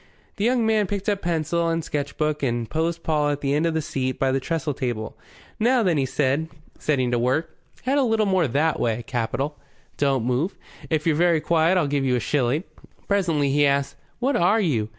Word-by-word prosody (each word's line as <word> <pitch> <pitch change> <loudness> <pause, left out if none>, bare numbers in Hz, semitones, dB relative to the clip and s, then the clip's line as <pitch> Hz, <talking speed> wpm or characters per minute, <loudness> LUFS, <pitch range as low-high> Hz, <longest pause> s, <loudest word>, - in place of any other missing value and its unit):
The 205 - 0
young 240 -1 +2
man 215 -2 +2
picked 200 0 -4
up 200 -1 -1
pencil 170 0 0
and 165 0 -1
sketch 145 -2 -4
book 150 -1 0
and 120 -4 -1
posed 165 +3 -2
Paul 150 -2 +1
at 145 0 -2
the 140 0 0
end 155 +3 +2
of 165 - -1
the 160 - 0
seat 130 -3 -2
by 135 -1 +1
the 135 - +1
trestle 155 +1 -2
table. 120 -5 -4 0.4
"Now, 240 +2 +3
then," 165 -8 +2
said 140 +4 0
he, 150 - -23 0.2
setting 130 -5 0
to 120 - +1
work. 140 +7 0 0.3
"Head 275 +3 +2
a - - +3
little 225 -3 +2
more 190 -5 +2
that 150 +6 +1
way. 115 0 0
Capital. 135 +5 -2 0.4
Don't 135 -4 +1
move. 130 +10 -1 0.3
If 155 -2 0
you're 160 -2 +3
very 170 0 +3
quiet 165 +3 +2
I'll 175 - +2
give 140 -1 0
you 130 -2 +2
a - - +1
shilling." 140 +4 0 0.4
Presently 165 -8 +1
he 145 +1 +3
asked, 140 0 +1 0.2
"What 265 +3 0
are 190 +6 +3
you? 125 - 0
150 Hz, 210 wpm, -24 LUFS, 135-170 Hz, 0.4 s, Now